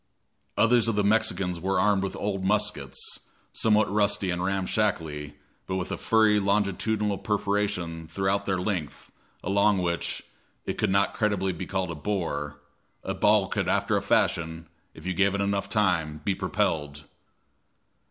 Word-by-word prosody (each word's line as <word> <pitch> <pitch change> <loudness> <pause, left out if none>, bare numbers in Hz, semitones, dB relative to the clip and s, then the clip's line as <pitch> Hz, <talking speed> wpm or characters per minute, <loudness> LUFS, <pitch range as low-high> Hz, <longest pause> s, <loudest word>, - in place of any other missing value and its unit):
Others 115 0 +4
of 115 - +1
the 105 - +2
Mexicans 100 -4 +2
were 95 +3 0
armed 105 -2 +3
with 95 - -3
old 100 -2 -2
muskets, 100 -9 -1 0.3
somewhat 110 -1 +3
rusty 100 -2 +1
and 90 0 -2
ramshackly, 90 -6 -1 0.3
but 95 - -2
with 95 -1 -3
a - - -1
furry 110 -2 +3
longitudinal 105 +1 0
perforation 100 -6 -1
throughout 95 +3 -1
their 95 -1 +1
length, 90 -6 -4 0.3
along 100 +1 +3
which 85 -2 -2 0.4
it - - -4
could - - +2
not 100 +1 +2
creditably 100 -4 0
be 85 - -6
called 95 -3 -2
a - - -5
bore 75 -5 -3 0.4
a - - -2
ball - - +3
could - - -2
after - - +1
a - - +1
fashion, 80 -2 0 0.3
if 80 - -12
you 90 - -1
gave 100 +2 +2
it - - 0
time 100 0 0 0.6
enough, 75 0 -13
be 100 - +2
propelled. 75 -5 -1
95 Hz, 150 wpm, -26 LUFS, 85-105 Hz, 0.6 s, Others